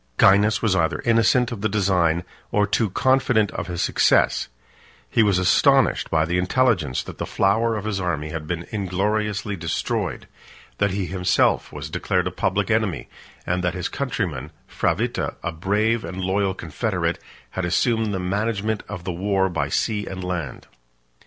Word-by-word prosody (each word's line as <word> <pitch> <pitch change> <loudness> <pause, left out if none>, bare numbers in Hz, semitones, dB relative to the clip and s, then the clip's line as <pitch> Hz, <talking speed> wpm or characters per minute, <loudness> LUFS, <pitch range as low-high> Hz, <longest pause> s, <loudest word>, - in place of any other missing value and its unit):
Gainas 105 +3 +4
was 105 -4 +3
either 80 -3 +1
innocent 115 +2 +3
of 110 -4 -5
the 110 - +1
design, 90 -5 +2 0.3
or 105 0 +3
too 105 +1 +1
confident 125 -2 +2
of - - -5
his 90 -2 -2
success; - - +3 0.6
he 115 - +2
was 100 -4 +3
astonished 95 -1 +3
by 80 -1 +2
the 90 +2 0
intelligence 90 - +1
that - - -10
the - - -2
flower 110 +4 +2
of 105 - -5
his 105 -2 -1
army 80 -4 -2
had 75 -1 -5
been 85 0 -3
ingloriously 105 +1 -1
destroyed; 85 -2 -3 0.5
that 100 - +3
he 95 0 -2
himself 90 0 +1
was - - -6
declared - - -1
a - - -2
public - - 0
enemy; - - 0 0.4
and 90 +1 -1
that 90 0 0
his 90 - -3
countryman, 90 - -3 0.2
Fravitta, - - -1
a 85 - -2
brave 105 +7 0
and 90 +3 -6
loyal 95 +1 0
confederate, 85 0 -2 0.3
had 95 - -3
assumed 110 +5 +1
the 95 - -2
management 105 +3 -1
of 95 -4 -6
the 90 - -3
war 95 +1 +1
by 85 - -2
sea 105 -2 -1
and 95 -1 -6
land. 90 -3 -4
95 Hz, 165 wpm, -23 LUFS, 90-105 Hz, 0.6 s, Gainas